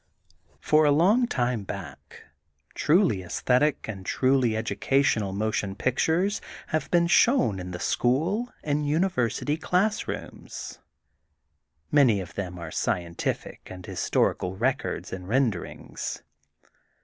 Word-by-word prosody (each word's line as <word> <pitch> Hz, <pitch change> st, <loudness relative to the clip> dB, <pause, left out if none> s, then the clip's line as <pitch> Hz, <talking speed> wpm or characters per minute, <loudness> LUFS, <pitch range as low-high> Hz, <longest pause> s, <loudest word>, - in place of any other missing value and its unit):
For 155 Hz, 0 st, +3 dB
a 150 Hz, -, +4 dB
long 200 Hz, -, +4 dB
time 120 Hz, -, -1 dB
back 95 Hz, -8 st, -9 dB, 0.5 s
truly 155 Hz, -, +3 dB
aesthetic 125 Hz, -, +1 dB
and 100 Hz, -4 st, -6 dB
truly 130 Hz, +1 st, +2 dB
educational 110 Hz, -3 st, +1 dB
motion 100 Hz, -1 st, -2 dB
pictures 165 Hz, -, +1 dB, 0.3 s
have 155 Hz, -, -1 dB
been 170 Hz, -1 st, +3 dB
shown 170 Hz, -, +3 dB
in 90 Hz, 0 st, -6 dB
the 90 Hz, -1 st, -6 dB
school 170 Hz, -, 0 dB
and 145 Hz, 0 st, 0 dB
University 150 Hz, -, 0 dB
class 190 Hz, +6 st, 0 dB
rooms. -, -, -7 dB, 1.1 s
Many 130 Hz, -8 st, +5 dB
of 90 Hz, -1 st, -7 dB
them 90 Hz, -3 st, -5 dB
are 85 Hz, -2 st, -7 dB
scientific 85 Hz, +1 st, -2 dB
and 90 Hz, -1 st, -9 dB
his -, -, -6 dB
torical 90 Hz, +1 st, 0 dB
records 130 Hz, +3 st, -1 dB
and 90 Hz, -1 st, -6 dB
renderings. 115 Hz, -7 st, -2 dB
125 Hz, 115 wpm, -26 LUFS, 95-155 Hz, 1.1 s, Many